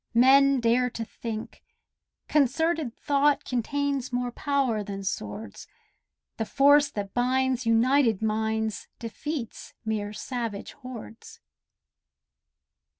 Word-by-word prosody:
Men 270 Hz, +2 st, +6 dB
dare 240 Hz, +2 st, +2 dB
to 230 Hz, -1 st, -5 dB
think. 220 Hz, 0 st, -7 dB, 0.7 s
Concerted 300 Hz, -1 st, +1 dB
thought 285 Hz, 0 st, +2 dB
Contains 275 Hz, +2 st, -1 dB
more 245 Hz, 0 st, -1 dB
power 265 Hz, -5 st, 0 dB
than 195 Hz, -1 st, -6 dB
swords: 105 Hz, -, -5 dB, 0.7 s
The 225 Hz, -, -1 dB
force 285 Hz, +1 st, +5 dB
that 200 Hz, -2 st, -5 dB
binds 255 Hz, 0 st, +1 dB
united 230 Hz, -1 st, +3 dB
minds 220 Hz, 0 st, -1 dB
Defeats 235 Hz, +2 st, -6 dB
mere 210 Hz, -2 st, -2 dB
savage 230 Hz, -2 st, -5 dB
hordes. 245 Hz, -, -10 dB
245 Hz, 95 wpm, -27 LUFS, 220-275 Hz, 0.7 s, Men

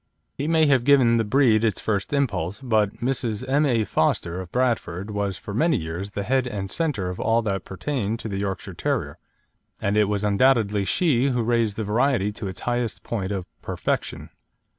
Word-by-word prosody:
He 145 Hz, -, -3 dB
may 160 Hz, -1 st, +4 dB
have 135 Hz, -4 st, +3 dB
given 130 Hz, -4 st, +5 dB
the 115 Hz, -, +2 dB
breed 115 Hz, -1 st, +3 dB
its 110 Hz, -4 st, +1 dB
first 100 Hz, -2 st, -2 dB
impulse, 110 Hz, -, -1 dB
but 110 Hz, -4 st, 0 dB
Mrs. 125 Hz, -2 st, -1 dB
M. 145 Hz, +3 st, +3 dB
A. 115 Hz, -4 st, +2 dB
Foster, 90 Hz, -1 st, 0 dB
of 90 Hz, -2 st, -10 dB
Bradford, 110 Hz, -6 st, -1 dB
was 100 Hz, -2 st, -2 dB
for 100 Hz, -, -8 dB
many 155 Hz, +5 st, +2 dB
years 85 Hz, +3 st, -5 dB
the 100 Hz, 0 st, -4 dB
head 130 Hz, +3 st, +1 dB
and 100 Hz, -4 st, -4 dB
centre 140 Hz, -, -1 dB
of 90 Hz, -, -8 dB
all 115 Hz, +1 st, +2 dB
that 95 Hz, -4 st, -2 dB
pertained 115 Hz, +1 st, -2 dB
to -, -, -5 dB
the 100 Hz, -2 st, -3 dB
Yorkshire 95 Hz, -1 st, -4 dB
Terrier, -, -, -2 dB, 0.6 s
and 100 Hz, +1 st, 0 dB
it 105 Hz, 0 st, +4 dB
was 105 Hz, 0 st, -1 dB
undoubtedly 105 Hz, -1 st, +3 dB
she 140 Hz, -, +2 dB
who 125 Hz, -3 st, 0 dB
raised 115 Hz, -3 st, +1 dB
the 110 Hz, -, -3 dB
variety 105 Hz, 0 st, +1 dB
to 105 Hz, -1 st, -6 dB
its 95 Hz, -1 st, -6 dB
highest 120 Hz, -2 st, -2 dB
point 100 Hz, -4 st, -3 dB
of 95 Hz, -3 st, -3 dB, 0.2 s
perfection. -, -, -3 dB
110 Hz, 190 wpm, -24 LUFS, 100-130 Hz, 0.6 s, given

